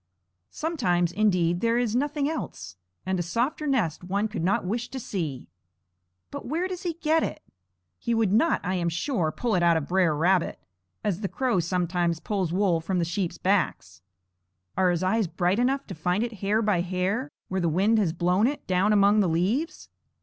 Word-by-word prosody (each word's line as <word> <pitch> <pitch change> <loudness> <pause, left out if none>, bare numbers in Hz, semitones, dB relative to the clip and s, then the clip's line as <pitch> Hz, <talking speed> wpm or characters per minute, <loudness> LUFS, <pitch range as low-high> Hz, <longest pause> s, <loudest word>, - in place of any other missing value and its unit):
Sometimes, 180 - 0
indeed, 180 -4 +1
there 230 0 +2
is 240 -2 0
nothing 290 +2 0
else, 310 - -5 0.3
and 190 0 -1
a - - +1
softer 240 - -1
nest 210 - 0
one 200 +4 0
could 210 -6 -4
not 185 +1 +1
wish 235 +6 -2
to 265 - -5
see. 160 - -4 0.8
But - - -7
where 330 +7 -1
does 370 -2 -6
he 345 -2 -2
get 320 0 +1
it? - - -4 0.6
He 235 -1 -1
would 220 -4 +2
not, 320 +10 +3
I 185 - -1
am 175 -2 0
sure, 175 - -1
pull 235 +6 -2
it 180 - +2
out 170 -1 +4
of 150 -3 -3
Br'er 180 -4 +2
Rabbit, 175 +3 +2 0.5
as 205 -2 -1
the 200 - -1
crow 250 -3 0
sometimes 175 -1 0
pulls 190 -4 -2
wool 180 -3 +2
from 185 +3 -2
the 170 - +1
sheep's 175 +1 -2
backs. 180 - -1 0.7
Are 185 -1 +3
his 175 0 0
eyes 195 +2 +1
bright 175 +4 0
enough 270 +3 +1
to 195 - -7
find 180 +5 0
it 230 -4 -5
hair 210 +3 +1
by 205 -5 +2
hair 190 +9 -1 0.2
where 190 0 -2
the 170 - +1
wind 200 +7 +3
has 190 -6 +1
blown 180 +6 +2
it, 290 +2 -4
down 190 +3 +2
among 205 +1 +5
the 190 -4 +3
leaves? 200 - -1
190 Hz, 195 wpm, -26 LUFS, 175-235 Hz, 0.8 s, among